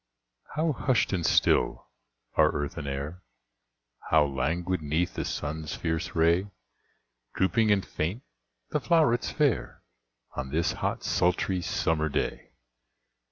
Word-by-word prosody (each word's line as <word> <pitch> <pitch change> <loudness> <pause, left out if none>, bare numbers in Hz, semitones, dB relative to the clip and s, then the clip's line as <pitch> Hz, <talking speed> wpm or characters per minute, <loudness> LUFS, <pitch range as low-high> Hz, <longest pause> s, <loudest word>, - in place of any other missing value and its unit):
How 160 +1 +2
hushed 130 -4 +1
and 90 -3 0
still 60 - +3 0.5
are 75 -1 +4
earth 75 -1 -3
and 75 -3 -5
air, 70 +6 -4 0.9
How 80 -2 +5
languid 80 +7 -1
'neath 80 +4 0
the - - -2
sun's 75 +1 -4
fierce 80 +1 -2
ray 85 +4 +3 0.9
Drooping 100 +4 +2
and 100 -2 +2
faint 90 +10 -3 0.5
the 150 - +1
flowrets 140 -3 +2
fair, 145 -6 0 0.5
On 65 - -4
this 80 +4 +1
hot, - - -2
sultry, 90 +1 +1
summer 80 -2 0
day! - - -2
85 Hz, 120 wpm, -28 LUFS, 75-100 Hz, 0.9 s, How